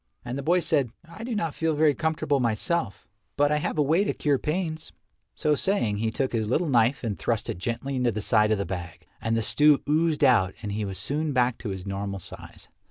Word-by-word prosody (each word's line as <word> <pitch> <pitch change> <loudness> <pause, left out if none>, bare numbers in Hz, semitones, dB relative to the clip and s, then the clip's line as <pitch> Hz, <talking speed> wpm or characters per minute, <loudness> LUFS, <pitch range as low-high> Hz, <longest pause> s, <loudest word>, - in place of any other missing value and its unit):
And 120 +1 -4
the 140 - -3
boy 175 +5 +2
said, 150 -8 +1 0.2
"I 170 +7 -10
do 235 -1 -3
not 165 -7 -1
feel 160 -1 0
very 150 -1 +4
comfortable 155 -2 0
myself, 120 - -1 0.3
but 145 0 +3
I 150 - +3
have 155 +1 -2
a 150 - +4
way 160 +7 +3
to 205 - -1
cure 145 -3 +1
pains." 160 -1 -3 0.4
So 150 - +1
saying 145 - +1
he 110 +2 0
took 130 +4 -2
his 110 -2 -1
little 165 +8 +1
knife 120 +1 +2
and 105 -7 -3
thrust - - -1
it - - -7
gently 120 +6 -3
into 125 -2 +2
the 110 - -4
side 105 0 +3
of 110 - +3
the 100 - -2
bag 85 -2 -7 0.2
and 115 0 0
the 115 - 0
stew 150 +5 +4
oozed 155 0 +2
out 110 -9 +4
and 105 - -3
he 105 +1 -2
was 95 -1 -5
soon 145 - -1
back 125 -2 +1
to 115 - -5
his 95 -1 -5
normal 100 0 -3
size. 95 - -9
130 Hz, 230 wpm, -26 LUFS, 105-155 Hz, 0.4 s, very